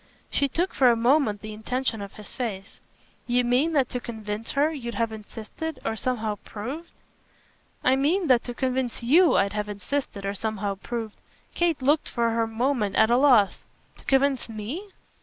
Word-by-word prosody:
She 280 - +2
took 345 +7 -1
for 255 -2 +5
a 235 - +4
moment 235 -3 +2
the 215 0 -7
intention 225 +1 -2
of 200 -1 -7
his 210 - -11
face. 205 -6 -5 0.5
"You 245 0 +2
mean 255 +7 +2
that 275 -4 +3
to 250 - -3
convince 220 -2 -5
her 290 +3 +3
you'd 240 -7 -5
have 230 +1 0
insisted 225 +8 -7
or 220 - 0
somehow 220 -3 -2
proved 270 +11 -6 0.5
?" - - -36
"I - - +5
mean 320 +8 +2
that 255 -5 +4
to 245 - -5
convince 255 -2 -1
YOU 325 +9 +5
I'd 200 +2 +2
have 210 0 -2
insisted 205 0 -3
or 200 - -1
somehow 205 -1 -2
proved 220 +2 -5 0.2
!" - - -35
Kate 335 -6 0
looked 295 +3 +2
for 235 -1 +1
her 225 0 +1
moment 225 -2 0
at 220 +1 +4
a - - +6
loss. 250 -8 +4 0.3
"To - - -17
convince 270 -2 +2
'me'?" 235 - -6
240 Hz, 185 wpm, -26 LUFS, 215-275 Hz, 0.5 s, a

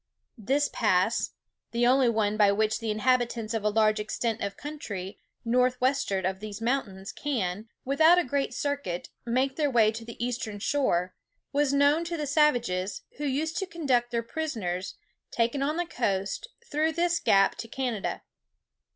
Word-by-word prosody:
This 275 +7 +1
pass, 210 0 +1 0.4
the 240 +1 +2
only 255 0 +5
one 215 -2 +1
by 205 -2 +5
which 215 +1 +1
the 225 -1 -3
inhabitants 235 0 +1
of 225 -2 -1
a 210 - +3
large 215 0 +3
extent 225 +1 -2
of 200 0 -3
country, 205 -11 -6 0.3
north 250 +2 +2
westward 255 -8 +1
of 190 0 -1
these 210 0 -7
mountains, 225 -5 -2
can, 220 -7 -3 0.2
without 315 +6 +5
a 355 - +4
great 275 +2 -1
circuit, 285 -12 -3 0.2
make 260 +3 +1
their 300 -2 +2
way 225 -4 +4
to 225 +1 -7
the 235 0 -10
eastern 230 -3 -3
shore, 200 -7 0 0.4
was 285 -1 +2
known 285 +3 +4
to 335 0 -3
the 300 - -2
savages, 240 - +1
who 295 - -3
used 300 +4 -1
to 385 - -3
conduct 265 -9 0
their 235 -1 -1
prisoners, 220 - -3 0.3
taken 235 +4 0
on 300 +3 0
the 350 - 0
coast, 200 - -2 0.2
through 315 -3 0
this 345 +1 +1
gap 195 0 +4
to 230 - -6
Canada. 235 -4 -3
240 Hz, 165 wpm, -28 LUFS, 210-285 Hz, 0.4 s, only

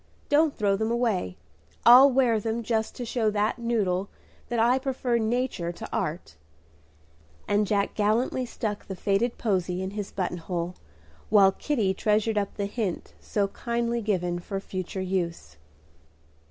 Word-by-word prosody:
Don't 295 0 +3
throw 200 -2 +2
them 220 +2 -1
away. 225 - 0 0.5
I'll 255 +4 +9
wear 245 -4 +3
them 225 +2 -2
just 220 -1 -1
to 245 - -5
show 225 -2 0
that 210 +3 0
noodle 205 -5 0 0.4
that 240 - -1
I 240 +3 +4
prefer 255 -3 -1
nature 225 -6 -1
to 220 +5 -8
art;" 180 - -3 1.1
and 205 0 +2
Jack 200 -1 0
gallantly 220 +5 +1
stuck 215 -3 -4
the 190 - -5
faded 200 +6 0
posy 185 -5 -1
in 190 - -4
his 205 -1 -5
button 180 -2 -3
hole, 175 +1 -3 0.6
while 200 -3 +6
Kitty 215 -4 0
treasured 210 +2 +1
up 200 - -4
the 200 - -2
hint 200 -3 -3
so 200 -2 -1
kindly 235 +2 -2
given 180 -5 -1
for 195 +3 -4
future 190 -1 -5
use. 170 - -3
210 Hz, 150 wpm, -26 LUFS, 190-235 Hz, 1.1 s, I'll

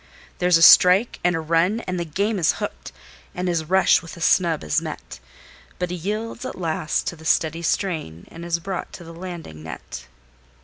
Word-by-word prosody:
There's 180 -1 +4
a 165 - +3
strike 185 +7 +7
and 175 -1 +2
a - - -1
run 170 +7 +1
as 185 - -4
the 170 -1 -3
game 200 +6 -1
is 165 - +3
hooked, - - -6 0.4
and 180 +1 -2
his 170 -3 -1
rush 190 +4 +4
with 165 0 -11
a - - -10
snub 170 -1 +2
is 75 - 0
met, 65 - -8 0.6
But 180 -1 -3
he - - -3
yields 215 +7 -4
at - - -6
last 160 -3 -1
to - - -3
the 160 - -15
steady 160 0 +1
strain, 155 - -2
and 165 - -10
is 170 -1 -1
brought 180 +2 -5
to - - -9
the 165 0 -11
landing 170 - -8
net. 65 -5 -9
170 Hz, 195 wpm, -22 LUFS, 160-185 Hz, 0.6 s, strike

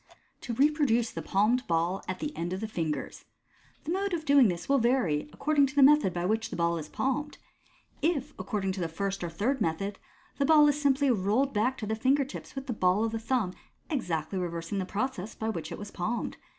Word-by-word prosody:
2. 235 - -5
To - - -14
Reproduce 280 -6 +3
the - - -5
Palmed 220 +6 +1
Ball 170 +3 0
at 185 - -3
the 300 -1 -5
End 175 -3 -3
of 190 - -4
th*, 220 -1 -4
Fingers. 160 -6 -3 0.3
— - - -32
The 310 - -4
mode 385 0 0
of 315 -2 -5
doing 280 -4 +6
this 175 -3 -3
will 275 0 +3
vary 225 - +1
according 290 - +2
to 265 - -10
the 285 - +6
method 295 -7 +6
by 175 0 -3
which 220 +3 0
the - - -5
ball 170 0 +1
is 155 -1 -8
palmed. 290 +3 -2 0.6
If 300 -3 0
accord 210 -5 -3
ing 190 - +1
to 185 0 -4
the 170 - 0
first 195 +3 -3
or 175 - -2
third 225 - -1
method, 195 +4 -1 0.4
the 280 - +3
ball 300 0 +6
is 295 0 +1
simply 280 -1 +3
rolled 230 +6 +1
back 245 +5 +1
to 215 - -4
the 215 - -1
finger 265 +5 +2
tips 275 - -9
with 270 -1 -5
the 250 - -2
ball 185 +1 +2
of 225 - 0
the 225 - -3
thumb, 225 -5 0 0.4
exactly 180 - -2
reversing 170 +2 -3
the 185 - -3
process 215 -2 -3
by 220 - -3
which 165 -7 -4
it - - -5
was 205 0 -8
palmed. 220 +6 -3
220 Hz, 230 wpm, -29 LUFS, 185-275 Hz, 0.6 s, doing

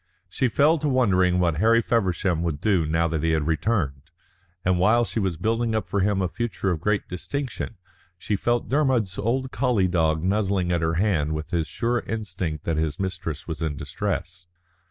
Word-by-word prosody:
She 130 - +1
fell 150 +7 +3
to 150 - 0
wondering 95 -9 +3
what 85 -4 +1
Harry 115 +5 +4
Feversham 95 -6 +1
would 80 -4 -2
do 90 -6 +2
now 80 +2 +2
that 80 -2 -2
he 80 +1 +1
had 80 -2 +1
returned, 80 - -1 0.6
and 90 -1 +2
while 115 +6 +4
she 115 - -3
was 95 -5 -1
building 115 +3 0
up 110 -3 -1
for 100 - -1
him 95 0 +1
a - - +1
future 100 -2 -2
of 80 -3 -2
great 105 +2 0
distinction 120 +6 -4 0.4
she 105 - -2
felt 120 +4 0
Dermod's 130 -9 +1
old 130 +5 -1
collie 120 -7 +2
dog 80 -3 +1
nuzzling 95 -2 +1
at 85 -1 +1
her 80 0 0
hand 80 -6 +1
with 75 +2 -5
his 85 -2 0
sure 120 +1 0
instinct 95 -8 -3
that 80 -2 -1
his 80 -2 -1
mistress 90 -6 -4
was 80 -2 -5
in 80 -2 -1
distress. 85 +4 -4
95 Hz, 190 wpm, -24 LUFS, 80-115 Hz, 0.6 s, Harry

